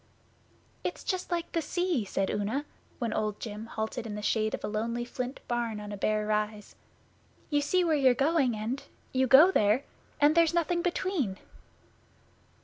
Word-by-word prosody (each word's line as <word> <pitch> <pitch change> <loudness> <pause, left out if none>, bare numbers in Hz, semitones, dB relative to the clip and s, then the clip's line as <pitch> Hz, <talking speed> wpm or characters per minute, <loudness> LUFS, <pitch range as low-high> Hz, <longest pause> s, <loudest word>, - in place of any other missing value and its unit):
'It's - - -4
Just 370 -2 -2
like 345 -1 -2
the 330 - 0
sea,' 350 - 0
said 195 0 -1
Una, 220 +8 -1 0.3
when 235 -3 -2
Old 210 -1 -1
Jim 215 0 -6
halted 225 +1 -4
in 210 - -5
the 210 - -6
shade 215 0 +1
of - - -12
a - - -1
lonely 230 +3 -2
flint 250 +2 -5
barn 235 -3 -1
on 210 0 -7
a - - -4
bare 215 +1 0
rise. 210 -1 -2 0.8
'You 290 0 +3
see 360 +6 +2
where 330 -2 +2
you're 265 -4 +4
going, 275 -3 +2
and 225 +6 -3 0.3
you 260 0 +2
go 300 +9 +8
there, 215 - +3 0.4
and 295 +1 +5
there's 335 0 +4
nothing 345 +1 +1
between. 345 - -1
245 Hz, 170 wpm, -29 LUFS, 215-310 Hz, 0.8 s, go